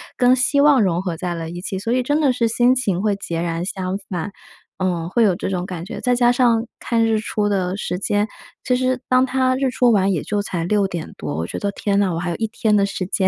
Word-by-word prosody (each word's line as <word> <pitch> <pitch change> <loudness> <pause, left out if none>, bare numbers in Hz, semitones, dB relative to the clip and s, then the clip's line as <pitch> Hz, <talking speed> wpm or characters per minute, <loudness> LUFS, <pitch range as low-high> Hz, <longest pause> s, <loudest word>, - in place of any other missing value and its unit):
跟 250 0 +4
希 260 +3 +2
望 285 -5 +5
融 175 -2 +1
合 180 -4 -3
在 175 +1 -3
了 165 -1 -5
一 175 +1 -7
起， 190 0 -4
所 225 +4 -3
以 250 +1 +2
真 290 +4 +1
的 280 -4 +4
是 240 -2 +1
心 240 +3 +3
情 200 -8 0
会 210 -1 +1
截 170 -4 -4
然 170 0 -2
相 190 0 -3
反， 180 +2 -3 0.5
嗯， 175 -3 -1
会 235 +5 +2
有 195 -5 +3
这 190 - -4
种 180 -2 -2
感 180 -4 -6
觉。 195 - -7
再 250 - +2
加 240 0 +4
上 240 -2 +2
看 230 -1 0
日 225 -1 +2
出 210 -1 -1
的 185 -2 0
时 180 - -3
间， 205 +2 0 0.4
其 250 - +1
实 255 0 0
当 255 0 +4
它 255 0 +1
日 265 0 0
出 250 -1 +3
完 195 -2 +3
也 170 -6 0
就 205 - -2
才 175 -5 -3
6:00 190 -4 -1
多， 75 -2 -4
我 80 +1 -2
觉 - - -5
得， 200 - -2
天 200 0 -1
呐， 195 -3 +1
我 165 - -2
还 175 +1 -3
有 170 - -2
一 225 - -1
天 215 -1 +1
的 200 - +3
时 195 -2 -4
间， 190 0 +1
205 Hz, 275 characters per minute, -20 LUFS, 180-245 Hz, 0.5 s, 望